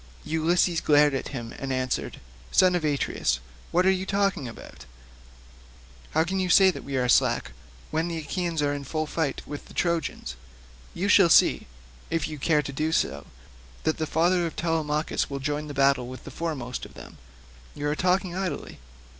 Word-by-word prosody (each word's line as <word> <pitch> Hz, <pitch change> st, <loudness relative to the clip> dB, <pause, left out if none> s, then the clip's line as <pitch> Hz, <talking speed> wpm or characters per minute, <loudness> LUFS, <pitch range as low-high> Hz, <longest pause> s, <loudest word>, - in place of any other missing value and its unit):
Ulysses 165 Hz, +2 st, +2 dB
glared 150 Hz, -1 st, +4 dB
at 135 Hz, -, -2 dB
him 120 Hz, -4 st, -6 dB
and 135 Hz, -1 st, -4 dB
answered, 130 Hz, -1 st, -2 dB, 0.3 s
"Son 185 Hz, -1 st, +5 dB
of 175 Hz, -2 st, 0 dB
Atreus, 140 Hz, -, 0 dB, 0.3 s
what 180 Hz, +2 st, +2 dB
are 190 Hz, -, +6 dB
you 190 Hz, 0 st, -2 dB
talking 195 Hz, -8 st, 0 dB
about? 115 Hz, -, -11 dB, 1.2 s
How 160 Hz, -, +2 dB
can 190 Hz, +3 st, -2 dB
you 185 Hz, -1 st, 0 dB
say 190 Hz, +1 st, +7 dB
that -, -, -8 dB
we 140 Hz, -1 st, -3 dB
are 125 Hz, -1 st, +1 dB
slack? 120 Hz, -, +3 dB, 0.4 s
When 160 Hz, +2 st, 0 dB
the 170 Hz, -1 st, -3 dB
Achaeans 165 Hz, 0 st, -2 dB
are 145 Hz, 0 st, +1 dB
in 140 Hz, -1 st, -4 dB
full 155 Hz, +3 st, -2 dB
fight 150 Hz, -3 st, -2 dB
with 145 Hz, -, -7 dB
the -, -, -15 dB
Trojans, 170 Hz, -, -1 dB, 0.6 s
you 190 Hz, +4 st, -1 dB
shall 195 Hz, -3 st, +6 dB
see, -, -, +5 dB, 0.4 s
if 165 Hz, 0 st, 0 dB
you 155 Hz, -2 st, -7 dB
care 150 Hz, +1 st, +2 dB
to 140 Hz, -, -6 dB
do 155 Hz, +3 st, -1 dB
so, 70 Hz, -, -1 dB, 0.6 s
that 155 Hz, -, 0 dB
the 155 Hz, -, -1 dB
father 175 Hz, +2 st, +2 dB
of 165 Hz, -, -8 dB
Telemachus 160 Hz, -2 st, -1 dB
will 140 Hz, -, -3 dB
join 150 Hz, +2 st, -2 dB
battle 140 Hz, -3 st, +2 dB
with 130 Hz, +1 st, -9 dB
the -, -, -9 dB
foremost 135 Hz, -7 st, -4 dB
of -, -, -10 dB
them. -, -, -12 dB, 0.6 s
You 145 Hz, 0 st, -3 dB
are 150 Hz, -, 0 dB
talking 180 Hz, +1 st, +1 dB
idly." 185 Hz, -6 st, -4 dB
155 Hz, 180 wpm, -26 LUFS, 140-175 Hz, 1.2 s, say